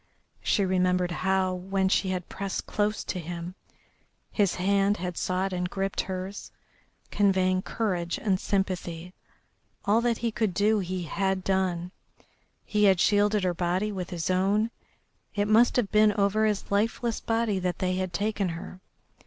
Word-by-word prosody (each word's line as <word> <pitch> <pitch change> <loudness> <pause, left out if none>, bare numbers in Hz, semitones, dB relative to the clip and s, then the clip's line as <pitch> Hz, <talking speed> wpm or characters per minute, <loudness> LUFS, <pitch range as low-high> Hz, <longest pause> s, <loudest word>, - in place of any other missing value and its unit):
She 200 - +2
remembered 180 -1 +1
how, 190 +1 +1
when 190 +1 -1
she 190 0 +2
had 180 -2 -3
pressed 195 0 -4
close 210 0 -1
to 185 - -4
him, 170 +1 -6 0.8
his 200 -4 +1
hand 200 +2 +2
had 180 -1 -4
sought 185 +2 -1
and 180 0 -2
gripped 195 +1 -1
hers, 190 +1 -6 0.6
conveying 185 -2 +2
courage 180 -6 -2
and 190 -3 0
sympathy. 180 -3 -2 0.7
All 215 +3 +3
that 235 -1 +1
he 235 0 -1
could 215 -5 -1
do 210 +2 +3
he 185 -1 -3
had 190 +3 -1
done, 185 -2 0 0.7
he 210 -1 +2
had 190 -3 +5
shielded 205 0 +3
her 180 -1 +1
body 180 +4 0
with 185 -3 -5
his 175 -2 -2
own, 200 +5 +2 0.6
it 205 0 +1
must 225 +3 +5
have 235 -6 +1
been 210 0 +5
over 210 +1 +2
his 210 -2 -2
lifeless 225 +3 0
body 225 -3 0
that 180 -1 -2
they 185 0 -1
had 185 -1 -2
taken 205 +1 -1
her. 170 +2 -8
190 Hz, 155 wpm, -27 LUFS, 180-205 Hz, 0.8 s, had